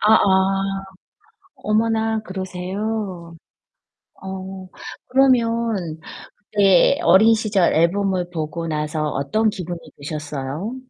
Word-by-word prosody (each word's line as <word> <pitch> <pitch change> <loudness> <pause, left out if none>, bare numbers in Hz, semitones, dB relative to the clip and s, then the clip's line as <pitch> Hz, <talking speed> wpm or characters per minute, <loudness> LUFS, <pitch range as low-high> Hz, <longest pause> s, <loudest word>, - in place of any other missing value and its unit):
아아. 195 -2 +3 0.7
어머나 220 +1 0
그러세요. 190 -1 -5 0.9
어. 190 0 -7 0.4
그러면 230 -10 +1 0.6
네 195 - +5
어린 220 - +6
시절 205 -5 +1
앨범을 180 +2 +1
보고 165 0 -4
나서 150 0 -2
어떤 215 +12 0
기분이 175 -3 -6 0.2
드셨어요? 150 - -5
190 Hz, 185 characters per minute, -21 LUFS, 170-215 Hz, 0.9 s, 어린